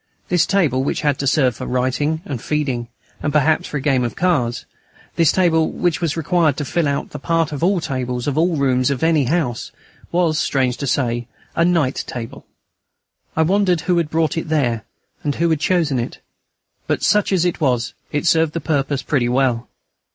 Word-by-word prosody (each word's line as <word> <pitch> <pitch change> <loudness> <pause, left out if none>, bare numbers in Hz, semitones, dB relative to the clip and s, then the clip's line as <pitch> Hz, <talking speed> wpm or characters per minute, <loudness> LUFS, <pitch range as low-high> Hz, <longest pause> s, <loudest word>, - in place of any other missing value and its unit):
This 180 -1 +3
table, 150 -10 +2
which - - -1
had 145 -3 +1
to 140 - -1
serve 130 -3 +2
for - - -6
writing 130 +6 0
and 130 -6 -5
feeding, 135 -6 -1 0.3
and 150 - -1
perhaps 155 +1 +2
for 150 - -3
a - - -3
game 135 -3 +2
of 120 - -3
cards, 145 -10 0 0.5
this 165 -3 +4
table, 165 -4 +2
which 175 -2 -1
was 165 -2 -1
required 165 -3 +2
to 145 - -2
fill 140 -1 0
the - - -9
part 165 +1 0
of 145 - -5
all 195 +3 +3
the 175 - -2
tables 125 -3 -3
of 145 - -1
all 165 +2 +2
the 140 - -2
rooms 130 -1 +2
of 140 0 -2
any 160 -4 +3
house, 135 -5 -1 0.4
was, 170 -3 +2
strange 130 -3 0
to 140 - -4
say, 120 -3 0 0.3
a 165 - +3
night 165 -7 +1
table. 115 -2 -7 0.9
I 160 - +3
wondered 185 -1 +2
who 175 +2 +1
had 165 -3 0
brought 160 0 0
it 160 - -7
there, 120 -8 0 0.4
and 145 -1 -1
who 170 0 +1
had 160 - +1
chosen 160 -6 +1
it. 120 - -5 0.7
But, - - -1
such 210 -1 +3
as 180 -3 +2
it 175 -1 -1
was, 125 -5 +1 0.2
it 150 +3 -1
served 160 -2 +3
its 165 - -4
purpose 140 -3 0
pretty 125 -5 +1
well. 125 -2 +1
150 Hz, 200 wpm, -20 LUFS, 130-165 Hz, 0.9 s, this